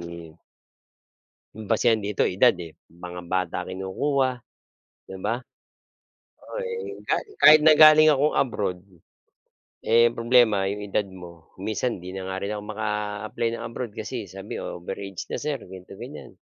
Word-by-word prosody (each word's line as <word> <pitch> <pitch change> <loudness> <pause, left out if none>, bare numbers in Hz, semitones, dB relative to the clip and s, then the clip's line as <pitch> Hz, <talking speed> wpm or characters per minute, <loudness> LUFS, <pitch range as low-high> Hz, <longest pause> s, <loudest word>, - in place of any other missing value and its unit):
mm 85 -2 -10 1.2
ang 110 - -7
basehan 115 0 +3
dito 100 0 -2
edad 90 - +4
eh. 85 -2 -10 0.2
Mga 90 +1 -8
bata 90 -1 -2
kinukuha, 115 +9 -1 0.8
di 95 - -7
ba? 115 +6 -2 1.0
Oo - - -9
eh, 465 -3 -5
kahit - - 0
kahit 155 0 +9
na 155 - +8
galing 155 0 +8
akong 145 +2 +1
abroad, 100 -8 0 1.1
eh, 115 +1 +5
problema 115 -4 +3
yung 105 +1 -4
edad 105 +1 0
mo. 90 -4 -13
Minsan, 110 -1 -2
'di 90 +1 -7
na 95 - -5
nga 95 0 -4
rin 100 - -3
ako 105 -1 -4
maka-apply 105 +1 -3
ng - - -5
abroad 115 -2 -6
kasi 110 +1 -5
sabi 95 +2 -8
over-age 95 +2 -6
na - - -3
sir 145 -4 -3
ganito 95 0 -12
ganyan. 130 -5 -9
105 Hz, 145 wpm, -25 LUFS, 95-120 Hz, 1.2 s, kahit